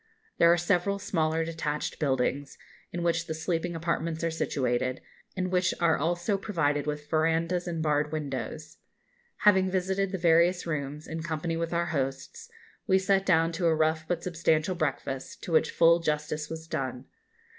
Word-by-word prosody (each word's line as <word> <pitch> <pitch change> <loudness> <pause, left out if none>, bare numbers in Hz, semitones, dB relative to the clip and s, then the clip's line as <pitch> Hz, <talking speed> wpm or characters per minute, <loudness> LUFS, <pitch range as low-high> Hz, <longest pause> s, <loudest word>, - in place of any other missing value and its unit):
There 170 - +7
are 175 - +4
several 180 +3 +1
smaller 160 -4 0
detached 155 -2 -3
buildings, 135 0 -1 0.3
in 175 0 -3
which 170 0 0
the 160 - -3
sleeping 165 +1 -2
apartments 165 0 -2
are 165 - +1
situated, 130 -4 -1 0.4
and 185 0 -1
which 185 0 +2
are 170 -2 +4
also 175 +6 0
provided 150 -8 0
with 150 0 -4
verandahs 165 +3 +1
and 165 -2 -2
barred 150 -1 +1
windows. 155 +1 -5 0.6
Having 190 -2 +5
visited 190 +1 0
the 190 - -2
various 170 +1 +3
rooms, 150 -2 -4
in 160 0 -4
company 160 +1 -2
with 165 0 -2
our 170 0 +1
hosts, 140 - -3 0.4
we 190 - +5
sat 195 0 +1
down 165 -2 +4
to 170 +1 0
a 160 - +3
rough 155 0 +1
but 170 -1 -2
substantial 165 -1 +1
breakfast, 140 -5 -3
to - - -5
which 160 - +3
full 170 0 +5
justice 150 -1 -2
was 160 0 -7
done. 130 -4 -4
165 Hz, 165 wpm, -28 LUFS, 150-175 Hz, 0.6 s, There